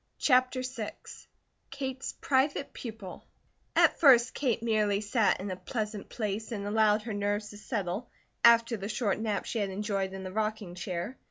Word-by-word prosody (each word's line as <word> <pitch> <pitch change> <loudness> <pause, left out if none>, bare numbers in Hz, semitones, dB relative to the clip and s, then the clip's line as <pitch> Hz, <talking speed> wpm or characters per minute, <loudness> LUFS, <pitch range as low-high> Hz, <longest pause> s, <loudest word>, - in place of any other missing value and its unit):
CHAPTER 255 -1 +3
VI 245 -4 -4 0.8
KATE'S 265 -1 -4
PRIVATE 275 +1 +1
PUPIL 220 -6 -8 0.5
AT - - +4
FIRST 255 -6 +6
Kate 245 -5 0
merely 210 -3 +2
sat 210 +1 +2
in 195 +1 -4
a - - -2
pleasant 210 +2 -4
place 215 0 -3
and 205 -3 -4
allowed 210 0 +3
her 225 -1 -4
nerves 205 +1 -1
to 205 - -11
settle, 210 0 -3 0.3
after 230 0 +6
the 200 +1 -5
short 215 -3 0
nap 220 -2 -1
she 230 - -2
had 200 -2 0
enjoyed 195 -1 -2
in 190 0 -6
the 185 0 -6
rocking 215 -3 -2
chair. 180 +6 -5
215 Hz, 165 wpm, -30 LUFS, 200-235 Hz, 0.8 s, FIRST